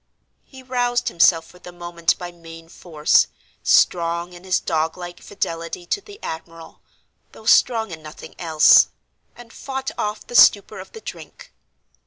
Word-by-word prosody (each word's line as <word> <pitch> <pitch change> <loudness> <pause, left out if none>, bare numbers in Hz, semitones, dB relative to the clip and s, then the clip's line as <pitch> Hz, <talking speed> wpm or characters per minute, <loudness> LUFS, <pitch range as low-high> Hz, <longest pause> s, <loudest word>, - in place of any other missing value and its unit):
He 260 -1 -14
roused 245 -1 -1
himself 165 -1 +3
for 180 +2 -18
the 180 - -11
moment 175 -1 -1
by 175 -1 -7
main 165 -1 -13
force—strong 170 +1 +1
in 175 0 -13
his 185 -1 +1
dog 160 +2 -2
like 175 -1 -9
fidelity 170 -2 -5
to 405 - -2
the 410 0 -14
admiral, 165 0 -9 0.5
though 220 - -15
strong 225 -3 +3
in 160 -1 -8
nothing 155 0 -11
else—and 170 +7 +2
fought 265 -1 -5
off 210 0 -3
the - - -12
stupor 205 -4 +5
of - - -12
the 445 - -10
drink. - - -11
175 Hz, 145 wpm, -21 LUFS, 165-220 Hz, 0.5 s, stupor